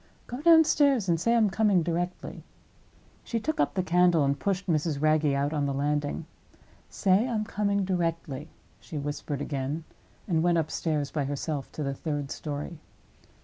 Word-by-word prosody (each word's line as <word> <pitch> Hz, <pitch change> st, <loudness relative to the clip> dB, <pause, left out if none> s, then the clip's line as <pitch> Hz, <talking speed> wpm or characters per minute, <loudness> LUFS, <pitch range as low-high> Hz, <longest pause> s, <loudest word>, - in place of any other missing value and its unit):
Go 245 Hz, +3 st, -6 dB
downstairs 295 Hz, -, +5 dB
and 170 Hz, -2 st, +2 dB
say 230 Hz, +5 st, +2 dB
I -, -, +4 dB
am 215 Hz, -4 st, +3 dB
coming 200 Hz, -5 st, +3 dB
directly." 175 Hz, +2 st, -3 dB, 0.8 s
She 230 Hz, -, -2 dB
took 315 Hz, +7 st, -3 dB
up 145 Hz, -, +1 dB
the 185 Hz, -, +1 dB
candle 175 Hz, -2 st, +4 dB
and 140 Hz, +1 st, 0 dB
pushed 195 Hz, -1 st, -1 dB
Mrs. 155 Hz, -4 st, 0 dB
Wragge 155 Hz, +1 st, +3 dB
out 140 Hz, +2 st, 0 dB
on 145 Hz, -2 st, 0 dB
the 140 Hz, -, -2 dB
landing. 145 Hz, +2 st, -1 dB, 0.6 s
"Say 195 Hz, +4 st, +2 dB
I 240 Hz, -, -2 dB
am 215 Hz, -, 0 dB
coming 200 Hz, -2 st, 0 dB
directly," 165 Hz, -5 st, -2 dB, 0.3 s
she 155 Hz, -, -8 dB
whispered 145 Hz, 0 st, -4 dB
again—and 155 Hz, +4 st, -4 dB
went 170 Hz, 0 st, +3 dB
upstairs 155 Hz, -2 st, -1 dB
by 145 Hz, -3 st, -1 dB
herself 145 Hz, 0 st, -3 dB
to 155 Hz, -, -4 dB
the 140 Hz, -1 st, -1 dB
third 145 Hz, -1 st, -4 dB
story. 150 Hz, +2 st, -5 dB
165 Hz, 165 wpm, -28 LUFS, 145-195 Hz, 0.8 s, downstairs